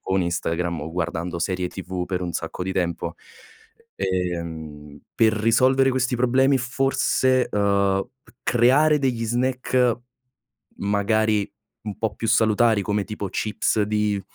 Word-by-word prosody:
con 95 0 0
Instagram 85 -1 -2
o 80 +2 -6
guardando 85 0 -3
serie 90 0 -1
TV 90 -1 -5
per 90 -1 -2
un 90 - -3
sacco 90 - -4
di 95 - -3
tempo. 90 -2 -2 0.8
Ehm, 80 -5 -4
per 110 -1 +4
risolvere 130 +5 +3
questi 130 0 0
problemi 130 +3 +3
forse, 130 0 +1
uhm, 100 -1 +2 0.2
c - - -21
creare 135 +6 +4
degli 125 -4 0
snack, 125 0 +1 0.8
magari 105 +1 +1 0.3
un 105 -2 -5
po' 110 - -2
più 115 - -4
salutari 110 -1 +3
come, 105 +1 -1
tipo, 105 -1 -5
chips 110 0 0
di 105 -1 0
105 Hz, 130 wpm, -23 LUFS, 90-120 Hz, 0.8 s, per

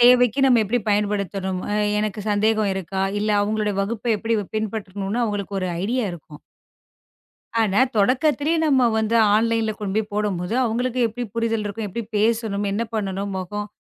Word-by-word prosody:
தேவைக்கு 245 0 +6
நாம 255 -3 +5
எப்படி 230 +4 0
பயன்படுத்தணும், 200 -2 -1
அ - - 0 0.2
எனக்குச் 210 0 -3
சந்தேகம் 215 0 +2
இருக்கா, 190 0 -3 0.2
இல்ல 215 - 0
அவங்களோட 210 0 0
வகுப்ப 225 +4 -2
எப்படி 225 +2 -1 0.2
பின்பற்றணும்னு 205 0 -3
அவங்களுக்கு 205 -2 -3
ஒரு 185 - -1 0.2
ஐடியா 240 +3 0
இருக்கும். 155 -3 -12 1.2
ஆனா 205 +1 +2 0.2
தொடக்கத்திலேயே 290 +8 +2
நம்ம 265 -4 +4
வந்து 220 +1 +1 0.2
ஆன்லைன்ல 225 0 +2
கொண்டுபோய் 210 +1 -2
போடும்போது, 205 -1 -1
அவங்களுக்கு 245 +2 -1
எப்படி 240 +3 -5
புரிதல் 225 -2 0
இருக்கும், 210 +1 -4
எப்படி 230 +4 -4
பேசணும், 220 -2 +1
என்ன 215 +3 0
பண்ணனும், 195 -2 -2
முகம் 205 +3 -4
215 Hz, 145 wpm, -22 LUFS, 200-230 Hz, 1.2 s, தேவைக்கு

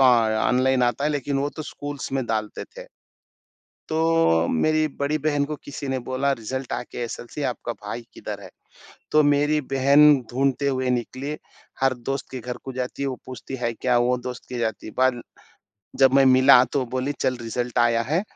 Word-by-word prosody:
Online 125 +2 +3
आता 120 +3 +1
है, 150 - +2
लेकिन 140 -1 -1
वो 140 +1 0
तो 155 - -4
स्कूल्स 145 -2 -6
में 135 -2 0
डालते 110 -2 -3
थे। - - -8 1.0
तो 160 - +3
मेरी 155 - +2
बड़ी 145 +2 +1
बहन 145 -2 +2
को 150 +1 -4
किसी 140 -1 -6
ने 130 0 0
बोला 130 +2 0
रिजल्ट 130 +2 -5
आके 125 - -5
एसएलसी 120 +4 -6
आपका 120 -2 -3
भाई 115 +2 -7
किधर - - -6
है? - - -10 0.6
तो 155 - +6
मेरी 145 +1 +3
बहन 140 +3 +6 0.2
ढूँढते 135 +2 +1
हुए 130 -1 0
निकली। 130 +4 -3 0.4
हर 135 -1 +3
दोस्त 125 +1 -5
के 130 - -6
घर 125 +1 -5
को 135 - -5
जाती 125 +2 -4
है, 140 - 0
वो 130 - -4
पूछती, 130 +1 -7
है 120 -1 -1
क्या? 125 +1 +1
वो 125 +1 +2
दोस्त 125 0 -7
के 125 - -5
जाती। 110 -2 -3
बाल 130 -2 +3 0.8
जब 135 -1 +5
मैं 135 0 +6
मिला, 130 0 +7
तो 140 - -2
वो 130 - -2
बोली 130 +3 -1
चल 130 - +1
रिजल्ट 120 +1 -3
आया 115 -1 +3
है 155 +9 0
130 Hz, 185 wpm, -24 LUFS, 120-140 Hz, 1.0 s, मिला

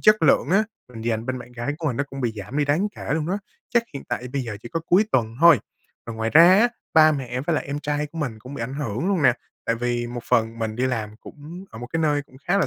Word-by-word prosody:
chất 215 -4 +5
lượng 145 -1 +4
á, 200 +4 +4 0.3
mình 115 - -8
dành 115 0 -1
bên 130 0 -2
bạn 125 0 -11
gái 120 +5 -3
của 160 - -3
mình 125 -5 0
nó 140 - 0
cũng 135 -1 -8
bị 120 -3 0
giảm 115 +7 -6
đi 145 - +3
đáng 160 +9 +1
kể 145 - -2
luôn 160 -1 -1
đó, 195 +3 -1 0.4
chắc 235 - +5
hiện 140 - -6
tại 125 - -3
bây 140 -2 -1
giờ 110 -4 -5
chỉ 120 - -8
có 165 - -2
cuối 190 +5 +5
tuần 115 -2 +1
thôi. 170 -6 +8 0.5
Còn 115 -1 -7
ngoài 110 0 -1
ra 165 +2 +8
á, 240 +2 +5 0.3
ba 155 -1 +7
mẹ 125 -3 -3
với 155 +3 0
lại - - -1
em 140 +1 -3
trai 150 0 -1
của 165 +3 -10
mình 125 -8 -3
cũng 130 +6 -10
bị 115 - -4
ảnh 130 +4 -4
hưởng 140 - -2
luôn 185 -7 +1
nè. 125 -2 +6 0.3
Tại 115 - +2
vì 120 0 -1
một 120 0 -5
phần 115 +1 +2
mình 110 -1 -3
đi 130 +1 +1
làm 110 -4 -3
cũng 165 +6 -10
ở 110 - -10
một 120 - -6
cái 160 - 0
nơi 145 -2 +2
cũng 130 - -20
khá 200 +2 +3
là - - +2
135 Hz, 295 wpm, -23 LUFS, 120-155 Hz, 0.5 s, thôi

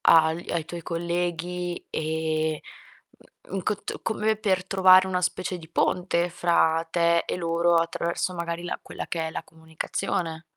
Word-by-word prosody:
agl 160 +1 +4
ai 165 -2 -1
tuoi 175 0 -6
colleghi 175 +1 -2
e, 160 0 -1 0.5
mh - - -24
mhmm, - - -5
in 190 - -2
cott 210 +2 -3
come 220 0 0
per 190 -4 +1
trovare 185 -1 +6
una 185 -1 0
specie 180 0 -1
di 160 -2 -12
ponte 175 +1 +1
fra 165 -1 +2
te 170 0 +3
e - - -2
loro, 170 0 +2
attraverso 170 +2 0
magari 170 0 -3
la 175 - -3
quella - - -7
che 165 -2 -2
è - - -4
la - - -4
comunicazione. 160 +1 -4
170 Hz, 160 wpm, -26 LUFS, 165-180 Hz, 0.5 s, trovare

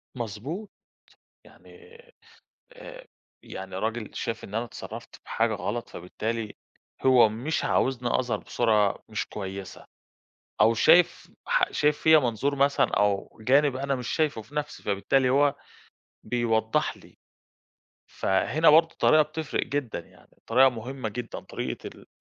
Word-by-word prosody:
مضبوط، 125 - -5 0.8
يعني 455 +1 -17 0.8
آآ، - - -12 0.4
يعني 95 0 -8
راجل 110 +2 -3
شاف 115 -1 -4
إن 105 - -8
أنا 115 +2 -1
اتصرّفت - - -10
بحاجة 115 0 0
غلط 105 +3 -4
فبالتالي 110 +5 -5 0.5
هو 125 -4 +6
مش 125 +9 -3
عاوزني 125 -2 +1
أظهر 120 -4 -1
بصورة 105 -3 +1
مش 110 - -3
كويسة، 95 -1 -7 0.8
أو 110 +2 +5
شايف 165 +9 +4 0.2
ح - - +1
شايف 150 0 +2
فيّا 160 0 +6
منظور 135 +2 -1
مثلًا 140 +1 +3
أو 100 -1 0
جانب 135 +4 +3
أنا 140 +1 -1
مش 125 -2 -5
شايفُه 155 -8 0
في 110 +8 -19
نفسي، 150 0 -4
فبالتالي 115 +6 +1
هو 140 +2 +3 0.7
بيوّضح 110 -1 0
لي، - - -19 0.9
فهنا 150 +12 +2
برضه 165 +2 +5
الطريقة 155 0 +4
بتفرق 155 0 -3
جدًا، 140 -5 -3
يعني - - -21
الطريقة 130 +4 +4
مهمة 125 0 -5
جدًا 115 +2 -6
طريقة - - -6
ال - - -16
120 Hz, 130 wpm, -26 LUFS, 110-145 Hz, 0.9 s, هو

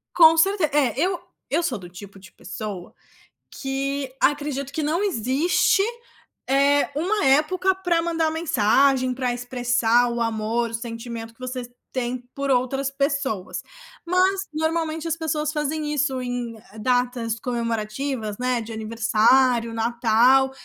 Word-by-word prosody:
Com 325 -1 +8
certe 385 +2 +3
é, 265 -7 +3
eu 365 +3 +1 0.3
eu 325 +5 +1
sou 255 -9 -1
do 180 -2 -11
tipo 195 +3 -12
de 190 0 -15
pessoa 205 -5 -7 0.6
que 270 0 -3
acredito 285 -1 0
que 310 - -3
não 330 +6 0
existe, 315 - +2 0.7
eh, 280 +2 +3
uma 370 +5 0
época 330 +8 +3
para 355 -3 +1
mandar 330 -1 0
mensagem 265 -3 +2
para 250 -1 -1
expressar 245 -1 +1
o 235 0 -2
amor, 230 +1 -1
o - - -11
sentimento 230 0 -6
que - - -35
você 255 -1 -5 0.2
tem 250 -1 -2 0.2
por 275 0 -2
outras 270 +2 0
pessoas. 275 -8 -2 0.4
Mas, 370 +2 +2
normalmente, 320 +1 -1
as 330 0 -1
pessoas 305 -2 -1
fazem 300 0 -2
isso 270 -3 0
em 245 -2 -4 0.2
datas 245 -1 0
comemorativas, 230 -1 -3
né. 250 -1 0
De 225 +1 -8
aniversário, 230 +2 +2
Natal, 235 +3 +3
260 Hz, 135 wpm, -23 LUFS, 235-300 Hz, 0.7 s, Com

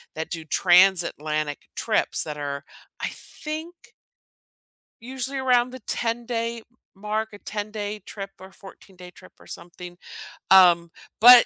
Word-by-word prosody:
that 160 0 -4
do 165 -2 -5
transatlantic 155 -4 +3 0.2
trips - - 0
that 150 -1 -6
are, 140 -1 -4 0.4
I - - -1 0.3
think 315 +3 -5 1.3
Usually 260 +2 -4
around 250 -2 +3
the 260 - -8
ten-day 230 0 -2 0.3
mark, 210 +2 -3
a - - -9
ten-day 210 0 -5
trip 195 -1 -7
or 190 +1 -12
fourteen-day 190 -2 -14
trip - - -16
or - - -17
something. 175 0 -10 0.5
Um, 175 -3 +7 0.3
but 245 +1 +10
205 Hz, 120 wpm, -24 LUFS, 175-235 Hz, 1.3 s, but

